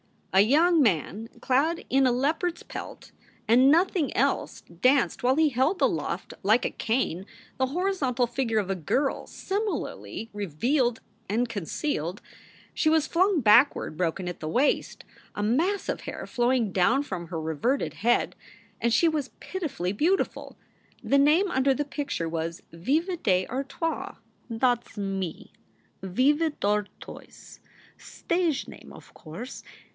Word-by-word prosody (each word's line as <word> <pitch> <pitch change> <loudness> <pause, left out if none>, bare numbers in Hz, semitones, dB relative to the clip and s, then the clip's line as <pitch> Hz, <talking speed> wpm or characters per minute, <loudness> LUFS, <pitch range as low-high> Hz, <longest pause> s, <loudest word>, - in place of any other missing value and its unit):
A 190 - +5
young 315 - +4
man 205 - 0
clad 300 +6 +1
in 265 0 +4
a - - +3
leopard 315 +8 0
s - - -14
pelt - - -9 0.4
and 250 +4 +6
nothing 335 -2 +2
else 275 +3 0
danced 245 +10 +1
while 255 +2 +3
he 315 0 +4
held 275 +8 +1
aloft - - -1
like 220 +5 +3
a - - -1
cane 220 -6 -1 0.3
the 260 - +1
horizontal 280 -6 0
figure 240 -2 -1
of 200 -3 0
a - - 0
girl 265 - -1
similarly 400 - -4
revealed 230 - 0 0.3
and 235 +4 +1
concealed. 200 - -3 0.5
She 310 - +2
was 320 -1 +3
flung 370 -1 +2
backward, 230 - +4
broken 180 +1 -1
at 175 - -5
the 155 - -5
waist, 255 - 0 0.3
a 205 - -2
mass 330 - +1
of - - -2
hai~ - - -6
flowing 240 -3 +1
down 230 +10 +2
from 180 -10 -6
her 165 -1 -4
reverted 160 - -1
head; 240 +3 +1 0.4
and 235 +1 +1
she 330 +8 +4
was 300 -4 -3
pitifully 275 - -3
beautiful. 330 - -1 0.5
The 280 - +3
name 320 +7 +4
under 265 +1 +3
the 295 - -2
picture 280 - -3
was 165 +1 -4
Viva 305 - -1
d 185 - +1
Artoise. 275 +5 -3 0.3
"That 240 +1 +1
s - - -19
me, 195 -4 -4 0.5
Veva 280 - +2
Dartoys 205 0 -4 0.4
stage 340 -5 -2
name, - - -12
o - - -11
course. 175 - -9
255 Hz, 140 wpm, -26 LUFS, 200-300 Hz, 0.5 s, and